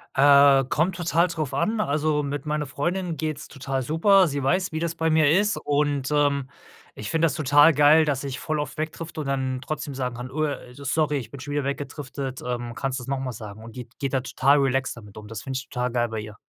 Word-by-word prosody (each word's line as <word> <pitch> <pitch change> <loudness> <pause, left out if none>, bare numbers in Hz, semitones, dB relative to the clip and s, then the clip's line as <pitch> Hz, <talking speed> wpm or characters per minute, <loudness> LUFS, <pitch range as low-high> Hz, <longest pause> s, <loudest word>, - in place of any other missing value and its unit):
Äh, 140 0 +6
kommt 175 +4 +1
total 170 0 +2
drauf 155 -5 -4
an, 215 +10 0
also, 150 -3 +1
mit 140 +1 -4
meiner 150 0 -1
Freundin 175 +5 -2
geht's 155 0 -4
total 135 -2 -3
super. 185 - +4
Sie 140 -1 -2
weiß, 185 +7 +1
wie 160 - -3
das 170 0 -2
bei 160 0 0
mir 155 -2 +4
ist 205 +4 +3
und, 145 -2 0
ähm, 140 -2 +1 0.5
ich 105 0 -6
finde 165 0 +3
das 145 - -3
total 145 +1 +5
geil, 150 +2 +6
dass 140 -2 -1
ich 135 0 -5
voll 155 -1 -2
oft 150 - -5
wegdrifte 160 0 -4
und 140 - -5
dann 130 -1 -1
trotzdem 150 0 -5
sagen 125 -2 -3
kann: 125 +1 -7
„Oh, 155 +2 -1
äh, 130 -4 -5
sorry, 145 +2 0
ich 115 -4 -6
bin 140 - -10
schon 145 +2 -7
wieder 145 -1 0
weggedriftet, 140 -1 -5
ähm, 120 -1 -4
kannst 135 +2 -3
du's 125 - -9
noch 135 -1 -1
mal 130 -1 -3
sagen.“ 110 0 -9
Und 115 +2 -11
die 125 - -5
d - - -31
geht 135 -1 -2
da 130 - +2
total 135 +2 +3
relaxed 135 -2 0
damit 105 -4 -13
um. 105 -1 -10
Das 110 0 -7
finde 130 -1 -3
ich 130 - -7
total 125 0 -2
geil 120 -1 0
bei 110 -1 -4
ihr. 105 0 -8
140 Hz, 240 wpm, -24 LUFS, 130-155 Hz, 0.5 s, Äh